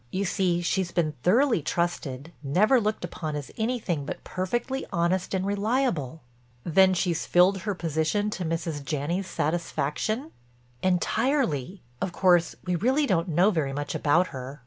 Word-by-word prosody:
You 195 +2 -1
see 175 -2 +1
she's 185 +1 0
been 160 -3 0
thoroughly 230 - +3
trusted—never 170 - 0
looked 215 0 -1
upon 155 -3 -5
as 145 -2 -6
anything 220 - -1
but 145 - -6
perfectly 240 +8 -2
honest 180 +1 0
and 190 0 -1
reliable." 200 - 0 0.4
"Then 185 +3 +4
she's 175 -2 -1
filled 185 +2 +4
her 205 +1 -3
position 165 +5 0
to 190 - -4
Mrs. 165 -3 -3
Janney's 155 +7 -2
satisfaction?" 170 - -2 0.5
"Entirely. 185 - 0 0.2
Of 180 - -2
course 175 -2 +3
we 180 -1 0
really 260 - +2
don't 180 -6 +1
know 175 +6 +4
very 150 -7 -1
much 145 +1 -3
about 170 +5 +2
her. 135 +2 -7
175 Hz, 145 wpm, -26 LUFS, 155-200 Hz, 0.5 s, Then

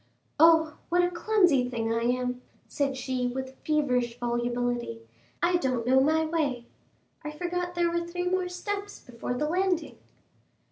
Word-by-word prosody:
"Oh, 320 -1 +5
what 355 +1 +3
a 355 - +1
clumsy 350 - +3
thing 225 -2 -1
I 230 - 0
am," 250 +1 -1 0.3
said 275 -2 -1
she 255 -1 -1
with 260 +1 -5
feverish 250 -6 0
volubility; 240 - -2 0.4
"I 350 +1 +4
don't 255 -7 -1
know 260 +2 +5
my 315 +3 +3
way. 290 -7 -1 0.6
I 300 - -4
forgot 355 +3 -3
there 345 -1 +2
were 340 0 -1
three 355 +1 -3
more 365 0 0
steps 405 +3 -5
before 245 0 -5
the 300 +4 -1
landing." 360 +1 0
290 Hz, 150 wpm, -28 LUFS, 245-350 Hz, 0.6 s, Oh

